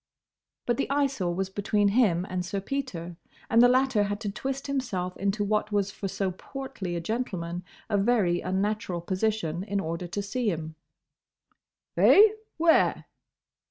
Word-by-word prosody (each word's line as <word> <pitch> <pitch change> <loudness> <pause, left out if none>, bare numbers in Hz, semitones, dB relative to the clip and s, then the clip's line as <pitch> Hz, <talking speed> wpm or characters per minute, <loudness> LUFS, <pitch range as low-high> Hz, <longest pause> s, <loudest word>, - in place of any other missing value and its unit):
But 240 -1 +1
the - - -1
Eyesore 270 -11 0
was 190 +1 -2
between 205 +1 +1
him 200 -6 +3
and 180 -1 -2
Sir 195 +3 -3
Peter, 190 -8 -4 0.3
and 230 - +6
the 245 - +8
latter 255 -4 +3
had 205 0 -3
to 205 - -2
twist 270 +5 -4
himself 230 -10 -2
into 200 +2 -1
what 210 +1 0
was 205 -1 +1
for 195 - -5
so 190 0 -1
portly 210 -3 -6
a - - -1
gentleman 180 -4 -3 0.2
a 205 -2 +1
very 195 -5 +2
unnatural 190 -1 -1
position 185 -2 -1
in 200 0 -2
order 170 0 -3
to 200 +4 -3
see 230 +3 -1
him. 160 -3 -4 1.2
"Eh? 425 +2 +8 0.3
Where?" 330 0 +3
200 Hz, 155 wpm, -27 LUFS, 180-240 Hz, 1.2 s, the